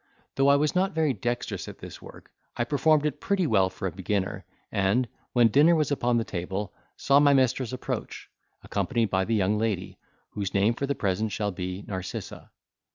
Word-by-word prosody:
Though 135 Hz, 0 st, +2 dB
I 140 Hz, -, +6 dB
was 150 Hz, +1 st, +1 dB
not 190 Hz, +1 st, +1 dB
very 155 Hz, -4 st, +2 dB
dexterous 120 Hz, +3 st, -3 dB
at -, -, -9 dB
this -, -, -10 dB
work, -, -, -13 dB, 0.3 s
I 120 Hz, -, +1 dB
performed 150 Hz, +3 st, +2 dB
it 150 Hz, -1 st, -2 dB
pretty 195 Hz, -3 st, +1 dB
well 95 Hz, -9 st, +3 dB
for 95 Hz, +1 st, -4 dB
a -, -, -3 dB
beginner, 95 Hz, +1 st, -2 dB, 0.3 s
and, 100 Hz, +6 st, +1 dB, 0.3 s
when 120 Hz, -2 st, +5 dB
dinner 150 Hz, +8 st, +5 dB
was 155 Hz, -2 st, +1 dB
upon 120 Hz, -4 st, +1 dB
the 115 Hz, -, +1 dB
table, 95 Hz, 0 st, -4 dB, 0.2 s
saw 140 Hz, +1 st, +4 dB
my 145 Hz, -1 st, +5 dB
mistress 130 Hz, -2 st, +1 dB
approach, 130 Hz, -, -5 dB, 0.4 s
accompanied 115 Hz, -5 st, -1 dB
by 95 Hz, 0 st, +1 dB
the 115 Hz, -, 0 dB
young 105 Hz, +1 st, +1 dB
lady, 105 Hz, -5 st, -2 dB, 0.3 s
whose 100 Hz, -2 st, -4 dB
name 100 Hz, +4 st, +3 dB
for 140 Hz, +4 st, -3 dB
the 140 Hz, -, -1 dB
present 105 Hz, +1 st, -1 dB
shall 105 Hz, +1 st, -1 dB
be 90 Hz, +1 st, -5 dB
Narcissa. 95 Hz, -2 st, -6 dB
115 Hz, 190 wpm, -27 LUFS, 100-140 Hz, 0.4 s, I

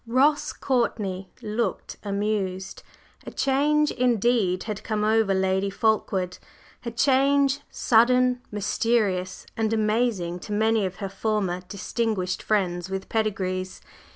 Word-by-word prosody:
Ross 275 Hz, +5 st, +3 dB
Courtney 205 Hz, -7 st, -1 dB
looked 215 Hz, -1 st, -2 dB
amused. 200 Hz, -2 st, -2 dB, 0.5 s
A -, -, -2 dB
change 295 Hz, +2 st, +2 dB
indeed 235 Hz, -6 st, +1 dB
had 210 Hz, -2 st, -5 dB
come 215 Hz, -1 st, -1 dB
over 220 Hz, -1 st, +3 dB
Lady 190 Hz, +1 st, +1 dB
Fulkeward 195 Hz, -4 st, 0 dB, 0.4 s
a 235 Hz, -, -3 dB
change, 275 Hz, +3 st, +3 dB
sudden, 250 Hz, +2 st, +3 dB
mysterious 205 Hz, -3 st, 0 dB
and 220 Hz, -1 st, 0 dB
amazing 215 Hz, -5 st, 0 dB
to 210 Hz, -, -9 dB
many 220 Hz, -1 st, +2 dB
of 185 Hz, -, -8 dB
her 195 Hz, -1 st, -5 dB
former 195 Hz, -3 st, -1 dB
distinguished 200 Hz, -1 st, -2 dB
friends 185 Hz, -4 st, 0 dB
with 190 Hz, 0 st, -4 dB
"pedigrees." 185 Hz, -4 st, -2 dB
215 Hz, 115 wpm, -25 LUFS, 190-235 Hz, 0.5 s, Ross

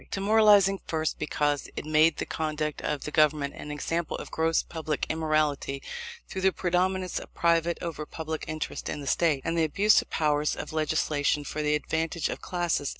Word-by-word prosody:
Demoralizing, 200 Hz, -1 st, +4 dB
first, 160 Hz, -2 st, -1 dB
because 145 Hz, -1 st, -1 dB
it -, -, -5 dB
made 155 Hz, +1 st, +4 dB
the -, -, -2 dB
conduct 155 Hz, -1 st, -3 dB
of 150 Hz, -2 st, -2 dB
the 150 Hz, -, -5 dB
Government 150 Hz, -2 st, +2 dB
an -, -, -8 dB
example 160 Hz, +3 st, -2 dB
of -, -, -8 dB
gross 160 Hz, 0 st, +1 dB
public 155 Hz, -3 st, -3 dB
immorality, 155 Hz, -3 st, 0 dB, 0.4 s
through 190 Hz, -, -5 dB
the 190 Hz, 0 st, +4 dB
predominance 185 Hz, 0 st, 0 dB
of -, -, -12 dB
private 170 Hz, 0 st, +2 dB
over 155 Hz, -3 st, -4 dB
public 160 Hz, -1 st, -5 dB
interests 155 Hz, 0 st, -4 dB
in -, -, -3 dB
the 145 Hz, -, -7 dB
State, 145 Hz, -1 st, +1 dB
and 165 Hz, -, 0 dB
the 165 Hz, -, +2 dB
abuse 200 Hz, +7 st, +4 dB
of -, -, -15 dB
the -, -, -5 dB
powers 150 Hz, -1 st, +1 dB
of -, -, -7 dB
legislation 150 Hz, -2 st, +1 dB
for 150 Hz, +1 st, -4 dB
the 150 Hz, 0 st, +2 dB
advantage 160 Hz, +2 st, -1 dB
of -, -, -5 dB
classes. 175 Hz, -5 st, -1 dB
155 Hz, 185 wpm, -27 LUFS, 150-170 Hz, 0.4 s, Demoralizing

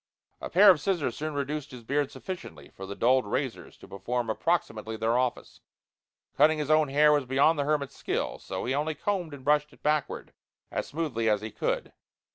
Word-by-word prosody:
A -, -, -6 dB
pair 195 Hz, +3 st, +8 dB
of 160 Hz, -6 st, 0 dB
scissors 150 Hz, -9 st, -1 dB
soon 155 Hz, 0 st, -4 dB
reduced 145 Hz, +1 st, -3 dB
his 125 Hz, -2 st, -11 dB
beard 140 Hz, +3 st, 0 dB
sufficiently 80 Hz, -, -8 dB
for 95 Hz, -, -9 dB
the 100 Hz, -, -6 dB
dulled 125 Hz, 0 st, +3 dB
razors -, -, -3 dB
to -, -, -14 dB
perform 115 Hz, +4 st, -3 dB
approximately 110 Hz, -6 st, -1 dB
their 115 Hz, +1 st, +1 dB
office. 125 Hz, -1 st, -2 dB, 0.7 s
Cutting 155 Hz, +1 st, +5 dB
his 150 Hz, 0 st, -1 dB
own 155 Hz, -1 st, +4 dB
hair 150 Hz, +2 st, +4 dB
was 145 Hz, -3 st, +2 dB
beyond 140 Hz, +4 st, +3 dB
the 140 Hz, -, +1 dB
hermit's 140 Hz, -2 st, -1 dB
skill. -, -, -2 dB
So -, -, -5 dB
he 130 Hz, -, 0 dB
only 150 Hz, +2 st, -1 dB
combed 180 Hz, -1 st, -2 dB
and 140 Hz, -2 st, -10 dB
brushed 150 Hz, 0 st, +2 dB
it -, -, -22 dB
backward 150 Hz, -1 st, -1 dB, 0.4 s
as -, -, -3 dB
smoothly 140 Hz, -8 st, -1 dB
as 105 Hz, -1 st, +2 dB
he 110 Hz, 0 st, -6 dB
could. -, -, -2 dB
145 Hz, 195 wpm, -28 LUFS, 120-155 Hz, 0.7 s, pair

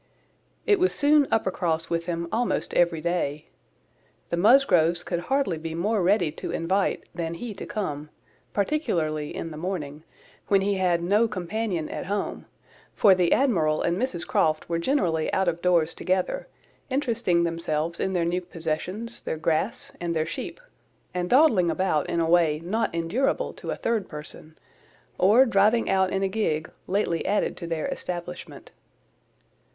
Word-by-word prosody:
It 410 Hz, -4 st, +4 dB
was 370 Hz, +1 st, +2 dB
soon 290 Hz, -1 st, +4 dB
Uppercross 175 Hz, -6 st, 0 dB
with 165 Hz, 0 st, -1 dB
him 170 Hz, -1 st, -2 dB
almost 240 Hz, +1 st, -1 dB
every 170 Hz, -2 st, +2 dB
day. 155 Hz, -3 st, -2 dB, 0.8 s
The -, -, +2 dB
Musgroves 175 Hz, -, +4 dB
could 175 Hz, -, -2 dB
hardly 220 Hz, -, 0 dB
be 160 Hz, 0 st, -5 dB
more 205 Hz, +5 st, 0 dB
ready 180 Hz, -3 st, +2 dB
to -, -, -7 dB
invite 190 Hz, +4 st, 0 dB
than 170 Hz, -1 st, -3 dB
he 230 Hz, +4 st, -6 dB
to 195 Hz, -, -8 dB
come, 150 Hz, -8 st, -4 dB, 0.4 s
particularly 165 Hz, -, -1 dB
in 165 Hz, -, -5 dB
the 155 Hz, -, -8 dB
morning, 155 Hz, -4 st, -4 dB, 0.5 s
when 195 Hz, -1 st, +4 dB
he 200 Hz, 0 st, 0 dB
had 175 Hz, -2 st, +1 dB
no 205 Hz, +6 st, +3 dB
companion 185 Hz, -3 st, -3 dB
at -, -, -6 dB
home, 200 Hz, +1 st, -3 dB, 0.5 s
for 200 Hz, -, +6 dB
the 180 Hz, -2 st, +2 dB
Admiral 165 Hz, -, +2 dB
and 170 Hz, -, +1 dB
Mrs 195 Hz, -5 st, -2 dB
Croft 155 Hz, -1 st, +1 dB
were 170 Hz, -1 st, -1 dB
generally 170 Hz, -, 0 dB
out 190 Hz, -1 st, +1 dB
of 170 Hz, 0 st, -1 dB
doors 170 Hz, -3 st, +2 dB
together, 185 Hz, 0 st, -1 dB, 0.4 s
interesting 235 Hz, -10 st, +1 dB
themselves 165 Hz, -1 st, -2 dB
in 190 Hz, -, -1 dB
their 175 Hz, -2 st, +1 dB
new 175 Hz, +2 st, 0 dB
possessions, 180 Hz, +7 st, -3 dB
their -, -, -3 dB
grass, 160 Hz, 0 st, -1 dB
and 170 Hz, -1 st, -2 dB
their 155 Hz, -1 st, +1 dB
sheep, 165 Hz, -, -6 dB, 0.5 s
and 180 Hz, 0 st, -2 dB
dawdling 245 Hz, -, +5 dB
about 165 Hz, -5 st, 0 dB
in 170 Hz, -, 0 dB
a 165 Hz, -, +2 dB
way 165 Hz, -3 st, +3 dB
not 220 Hz, +6 st, 0 dB
endurable 170 Hz, +12 st, 0 dB
to -, -, -9 dB
a -, -, -1 dB
third 225 Hz, -4 st, -1 dB
person, 155 Hz, +1 st, -9 dB, 0.6 s
or 215 Hz, +8 st, +6 dB
driving 215 Hz, 0 st, +3 dB
out 190 Hz, -1 st, +3 dB
in 195 Hz, 0 st, 0 dB
a -, -, +2 dB
gig, 185 Hz, -7 st, -1 dB, 0.2 s
lately 185 Hz, -4 st, 0 dB
added 205 Hz, +2 st, 0 dB
to 170 Hz, -, -7 dB
their 165 Hz, -2 st, -2 dB
establishment. 175 Hz, 0 st, -6 dB
175 Hz, 160 wpm, -25 LUFS, 165-205 Hz, 0.8 s, for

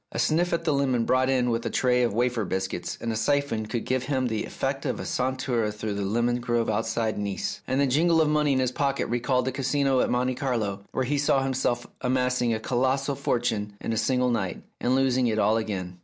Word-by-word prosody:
A -, -, -5 dB
sniff 175 Hz, +3 st, +2 dB
at 170 Hz, -, 0 dB
the 160 Hz, -3 st, +1 dB
lemon 130 Hz, -4 st, +1 dB
brought 130 Hz, +1 st, +2 dB
in 125 Hz, -2 st, +2 dB
with 115 Hz, 0 st, -1 dB
a -, -, -2 dB
tray 125 Hz, -1 st, +2 dB
of 120 Hz, -, +2 dB
wafer 120 Hz, +1 st, 0 dB
biscuits 95 Hz, -2 st, -3 dB
and 115 Hz, -, -2 dB
a -, -, -2 dB
siphon 115 Hz, -1 st, 0 dB
could 115 Hz, +1 st, -3 dB
give 130 Hz, 0 st, -1 dB
him 130 Hz, -2 st, 0 dB
the 110 Hz, -3 st, -1 dB
effect 135 Hz, 0 st, -3 dB
of 130 Hz, -, -2 dB
a -, -, -5 dB
saunter 130 Hz, -3 st, -1 dB
through 105 Hz, 0 st, -4 dB
the 100 Hz, -, -3 dB
lemon 120 Hz, +5 st, 0 dB
groves 120 Hz, -2 st, 0 dB
outside 115 Hz, 0 st, -1 dB
Nice, 100 Hz, -2 st, -3 dB
and 130 Hz, -, 0 dB
the 140 Hz, -, +4 dB
jingle 160 Hz, +5 st, +3 dB
of 160 Hz, -, +4 dB
money 150 Hz, -1 st, +2 dB
in -, -, +1 dB
his 130 Hz, -1 st, +1 dB
pocket 140 Hz, +1 st, 0 dB
recalled 125 Hz, +1 st, +1 dB
the 130 Hz, -, 0 dB
Casino 135 Hz, 0 st, +1 dB
at -, -, +2 dB
Monte 125 Hz, +1 st, +1 dB
Carlo, 115 Hz, -7 st, -2 dB
where 130 Hz, -, -1 dB
he 145 Hz, +3 st, 0 dB
saw 140 Hz, -1 st, +2 dB
himself 130 Hz, -2 st, -1 dB, 0.2 s
amassing 125 Hz, -1 st, +1 dB
a 110 Hz, -, 0 dB
colossal 130 Hz, +4 st, 0 dB
fortune 115 Hz, -5 st, -1 dB
in 115 Hz, -, -3 dB
a -, -, -1 dB
single 125 Hz, +1 st, +1 dB
night, 95 Hz, -7 st, -2 dB, 0.2 s
and 125 Hz, +2 st, +1 dB
losing 130 Hz, -2 st, +2 dB
it 110 Hz, -2 st, 0 dB
all 110 Hz, +1 st, +3 dB
again. 95 Hz, -5 st, -4 dB
125 Hz, 230 wpm, -26 LUFS, 115-135 Hz, 0.2 s, the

